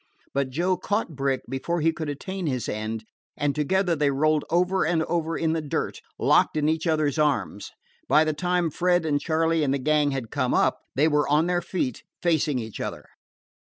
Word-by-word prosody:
But 140 -1 0
Joe 175 +7 0
caught 205 -3 -2
Brick 135 -1 0
before 145 +7 -2
he 165 +2 +3
could 160 -2 -4
attain 185 +5 -4
his 130 -5 -2
end, 110 +1 -4 0.3
and 145 -1 0
together 175 +4 +1
they 145 -2 +2
rolled 150 +2 +1
over 180 +3 +2
and 160 0 +1
over 165 -1 -1
in 160 -1 +1
the 165 - -1
dirt, 145 - -3 0.2
locked - - +3
in 150 0 +1
each 160 +2 0
other's 155 -2 +1
arms. 145 -9 0 0.4
By 155 - +5
the 155 -1 0
time 175 0 0
Fred 175 +1 +1
and 145 -2 +1
Charley 160 +1 +1
and 140 -1 +1
the - - 0
gang 150 +2 +2
had 135 -5 -4
come 130 -3 0
up, - - +2 0.2
they 145 +5 +4
were 150 -2 +1
on 150 +3 +3
their 175 0 +1
feet, 135 - -3 0.2
facing 155 -5 +1
each 110 -3 -6
other. - - -5
155 Hz, 195 wpm, -25 LUFS, 140-170 Hz, 0.4 s, By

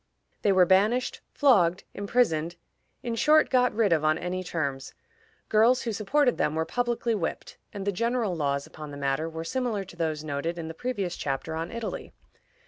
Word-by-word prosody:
They 205 - +3
were 185 -2 +5
banished, 210 +7 +2
flogged, 195 - +3
imprisoned; 195 -6 0 0.5
in 235 - -2
short, 305 +7 +4
got 250 -1 +4
rid 210 -5 +2
of 155 -2 +1
on 155 0 +3
any 180 +2 -3
terms. 140 -6 -3 0.5
Girls 230 +4 +4
who 230 - -2
supported 250 +6 +1
them 150 - +1
were 160 0 0
publicly 240 +1 -1
whipped, 190 -7 -4
and 200 -2 -6
the 200 - +1
general 230 -1 0
laws 140 -3 -1
upon 150 -1 -10
the 145 - -8
matter 140 +3 -1
were 160 0 -6
similar 225 +2 -2
to 175 - -13
those 160 -3 -2
noted 155 +3 -3
in 165 -1 -5
the 160 - -6
previous 200 -3 -3
chapter 140 +3 -3
on 165 +2 -4
Italy. 230 -2 -5
185 Hz, 180 wpm, -27 LUFS, 160-235 Hz, 0.5 s, were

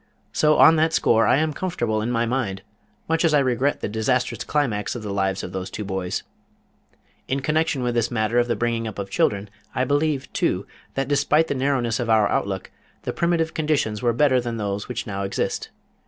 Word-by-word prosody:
So, 150 0 +3
on 160 0 +7
that 160 +1 +2
score, 115 -7 +3
I - - +4
am 155 0 0
comfortable 120 -11 -1
in 110 - -2
my 115 -1 +1
mind, 115 -6 -2 0.4
much 165 +1 +1
as 160 -3 +4
I - - +6
regret 130 +1 +1
the - - -1
disastrous 115 +4 0
climax 120 -10 -1
of 120 - -6
the 100 -2 -4
lives 95 -1 0
of - - -6
those 95 0 -4
two 105 - -5
boys. 95 -2 -3 1.0
In 135 +1 -1
connection 150 -2 0
with 120 0 0
this 120 -1 +1
matter 115 0 +1
of 120 - +2
the 120 - 0
bringing 115 -1 -1
up 110 - -7
of 100 -1 -5
children 100 +1 +1 0.3
I 130 - +2
believe, 145 +1 0
too, - - 0 0.3
that 135 -1 -1
despite 145 +3 +2
the - - +1
narrowness 130 -3 0
of 120 -2 -2
our 110 -2 +4
outlook, 95 -2 -2 0.3
the - - -3
primitive 170 -1 +1
conditions 150 -9 0
were 120 - +2
better 130 +1 +3
than 120 -1 -4
those 100 -1 -3
which 120 -1 -4
now 100 -3 -4
exist. 100 0 -2
120 Hz, 205 wpm, -23 LUFS, 105-145 Hz, 1.0 s, on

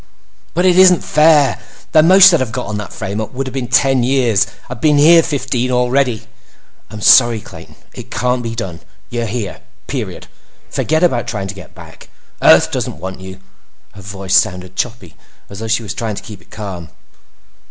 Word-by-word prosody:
"But 175 +2 +1
it 185 0 +4
isn't 185 -2 +5
fair! 150 -4 +3 0.3
The 155 - +5
most 185 +3 +7
I'd 170 - +3
have 130 -4 -3
got 125 +1 -4
on 105 -1 -5
that 105 - -8
frame 100 +3 -5
up 110 - -7
would've 130 0 -4
been 130 -2 -4
ten 135 +2 +2
years. 120 -5 +1 0.2
I've 125 -2 -9
been 150 -2 +3
here 165 +3 +6
fifteen 130 -5 -2
already!" 125 -2 0 0.7
"I'm 110 - -9
sorry, 120 0 +5
Clayton. - - -14 0.2
It - - -11
can't 125 0 -1
be 115 -1 -5
done. 95 -7 -6 0.3
You're 120 -1 -3
here. 105 - -5 0.2
Period. - - -6 0.5
Forget 160 +2 -1
about 125 -10 +1
trying 100 -3 -4
to - - -5
get 95 -4 -14
back. - - -14 0.3
Earth - - +5
doesn't - - -4
want 95 +3 -7
you." 95 0 -11 0.5
Her 100 - -13
voice 95 -1 -6
sounded 90 0 0
choppy, 110 -8 -5 0.4
as 100 - -9
though 115 - -5
she 115 +1 0
were 105 - -10
trying 110 +1 -4
to - - -8
keep 105 -5 -11
it - - -25
calm. 95 -6 -8
120 Hz, 185 wpm, -16 LUFS, 100-135 Hz, 0.7 s, most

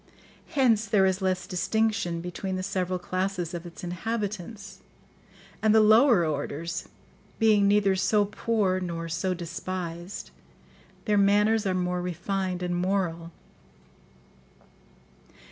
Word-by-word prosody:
Hence 230 -6 +3
there 200 -1 +4
is 190 +1 +1
less 185 -1 0
distinction 185 -2 0
between 180 +2 -4
the 185 - -3
several 185 -1 -1
classes 185 -1 -3
of 175 0 -6
its 170 - -12
inhabitants; 200 +1 -4 0.8
and 215 0 +4
the - - +7
lower 220 - +6
orders, 155 +2 -3 0.5
being 215 -3 +4
neither 200 -1 +3
so 205 +2 +2
poor 205 -2 0
nor 170 -2 -4
so 180 +3 -1
despised, 175 +1 -6 0.7
their 210 -2 +3
manners 205 +2 +3
are 185 - 0
more 180 0 -1
refined 180 +1 -3
and 175 0 -1
moral. 175 -2 -1
185 Hz, 115 wpm, -27 LUFS, 175-205 Hz, 0.8 s, the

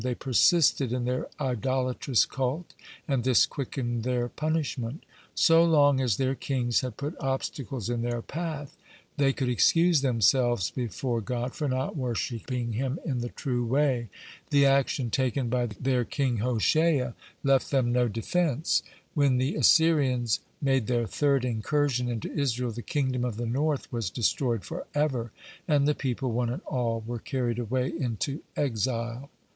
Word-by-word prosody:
They 125 -1 -1
persisted 135 0 +3
in 125 -1 -1
their 125 +1 -1
idolatrous 130 -1 +1
cult, 135 +6 -3 0.3
and 135 -5 0
this 130 -1 +5
quickened 120 -3 -3
their 120 0 -1
punishment. 150 -4 -2 0.3
So 165 0 +5
long 145 -5 +4
as 120 -6 +1
their 135 0 +1
kings 125 -3 0
had 125 -4 -5
put 145 +3 -4
obstacles 135 -3 -3
in 120 -1 -1
their 120 -1 -2
path, 155 -3 -5 0.4
they 140 -1 +3
could 135 -1 -2
excuse 165 - +4
themselves 120 -4 +2
before 120 0 -2
God 120 +4 -3
for 150 - -2
not 130 +4 -2
worshipping 120 -2 -3
Him 130 +5 -1
in 130 -6 -1
the 120 0 -3
true 125 -3 -2
way. 125 -2 +1 0.4
The 140 -1 +4
action 135 -3 +2
taken 130 -1 0
by 125 0 +1
their 125 +4 0
king 130 -1 -1
Hoshea 125 +4 +2 0.3
left 135 -1 +3
them 130 -4 +2
no 125 0 +2
defense. 150 +7 0 0.3
When 140 -4 +3
the 130 +6 0
Assyrians 135 -8 +3 0.2
made 135 -5 +1
their 120 -2 +1
third 140 +1 +1
incursion 125 +2 0
into 115 -3 -4
Israel, 125 -4 -1
the 115 +2 -6
kingdom 130 -2 -1
of 120 -4 -2
the 120 - -2
north 140 +5 -1
was 115 -6 -2
destroyed 115 0 0
forever, 135 -6 -2 0.4
and 145 -3 +3
the 150 - +3
people, 130 -2 -2
one 120 +1 0
and 125 - -4
all, 115 -3 -2
were 120 0 -4
carried 120 -2 -2
away 125 +2 -1
into 130 +3 -3 0.2
exile. 120 0 -2
125 Hz, 150 wpm, -27 LUFS, 120-140 Hz, 0.4 s, this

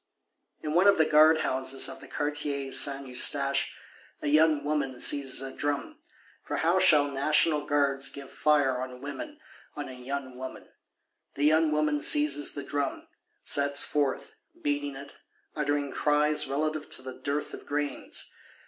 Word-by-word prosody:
In 150 - -3
one 180 +4 +4
of 200 - +5
the 160 - +4
Guardhouses 150 -4 +3
of 135 - -8
the - - -12
Quartier 145 -2 -3
Saint 140 0 +2
Eustache, 125 -1 +1 0.5
"a - - -2
young 155 -1 +3
woman" 145 -4 -2
seizes 135 -1 +2
a 135 - -7
drum,—for 145 -1 -6
how - - +2
shall 145 -1 +5
National 150 +2 +2
Guards 140 -2 +1
give 140 -1 -10
fire 140 -4 +1
on 130 -1 -7
women, 295 - -7 0.4
on 145 -2 -6
a - - -8
young 130 +1 -6
woman? 130 0 -8 0.7
The 145 - -3
young 155 +1 +3
woman 150 -1 0
seizes 145 0 +4
the 145 - -5
drum; 140 0 -4 0.3
sets 140 0 +4
forth, 145 -3 -2 0.3
beating 145 -1 -2
it, 140 +1 -11 0.4
"uttering 145 -2 -1
cries 150 +1 +1
relative 155 +2 -2
to 130 - -6
the 130 0 -7
dearth 145 +1 -3
of - - -10
grains." 145 0 -4
145 Hz, 150 wpm, -28 LUFS, 135-150 Hz, 0.7 s, of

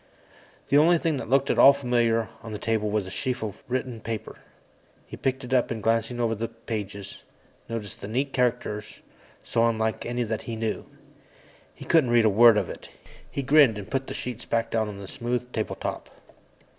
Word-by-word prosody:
The 140 - +6
only 170 +3 +5
thing 160 -2 0
that - - -6
looked 135 +1 +3
at - - 0
all 140 - +9
familiar 120 -4 +1
on 110 -1 -8
the - - -3
table 110 -1 -1
was 105 -2 0
a 95 - -8
sheaf 125 -1 -2
of 105 -3 -6
written 125 -1 -2
material. 110 -1 -5 0.7
He - - -9
picked 130 0 -2
it 125 +1 -4
up 125 -2 +3
and 110 -3 -4
glanced 115 +1 +1
over 120 -2 0
the 115 +1 -3
pages, 105 -4 -6 0.5
noticing 115 -3 -6
the - - -6
neat 135 +5 -1
characters, 115 -4 -1 0.5
so 115 - +1
unlike 110 -1 -1
any 120 +1 -2
that 110 -1 -3
he 115 - -3
knew. 110 -1 -3 0.9
He - - -10
couldn't 160 -7 +4
read 120 -1 +4
a - - +6
word 115 +2 +7
of 100 -4 0
it. - - -9 0.4
He 140 - -3
grinned 135 -5 +5
and 100 - -8
put 135 -1 -1
the - - -5
sheets 125 -1 -5
back 115 0 -1
down 110 -1 +1
on 105 -1 -7
the 100 -1 -8
smooth 125 0 -3
table 110 - -2
top. - - -5
115 Hz, 200 wpm, -26 LUFS, 110-125 Hz, 0.9 s, all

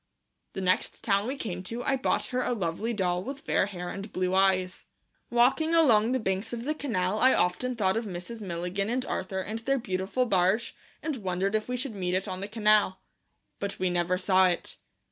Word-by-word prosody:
The 195 - -4
next 185 0 0
town 200 0 +2
we 265 - -2
came 185 -9 -4
to 235 +5 -5
I 270 - +2
bought 260 - 0
her 255 - +1
a 250 - 0
lovely 205 +2 -2
doll 180 -5 0
with 275 +4 -6
fair - - +1
hair 180 -3 -6
and 200 +1 -6
blue 185 0 -1
eyes. 190 -1 +2 0.4
Walking 265 +7 +3
along 235 -8 +5
the 260 - +1
banks 195 +2 -2
of 235 -1 -4
the 300 +4 0
canal 210 -9 -1
I 260 +3 +5
often 245 +8 0
thought 190 -4 +2
of 225 +1 -1
Mrs. 190 +4 -6
Milligan 180 +2 -2
and 255 +2 -1
Arthur 190 0 -3
and 215 +4 -4
their 275 +4 +1
beautiful 195 +2 -1
barge, 195 +2 +2 0.3
and 305 -3 -2
wondered 190 -1 -1
if 215 +2 -1
we 250 - -1
should 255 -1 -4
meet 180 -2 -1
it 185 - -1
on 185 0 -4
the 200 - -3
canal. 210 -3 +3 0.6
But 200 0 -4
we 185 -1 0
never 175 +1 +1
saw 185 0 +4
it. 175 -1 -2
200 Hz, 205 wpm, -28 LUFS, 185-240 Hz, 0.6 s, along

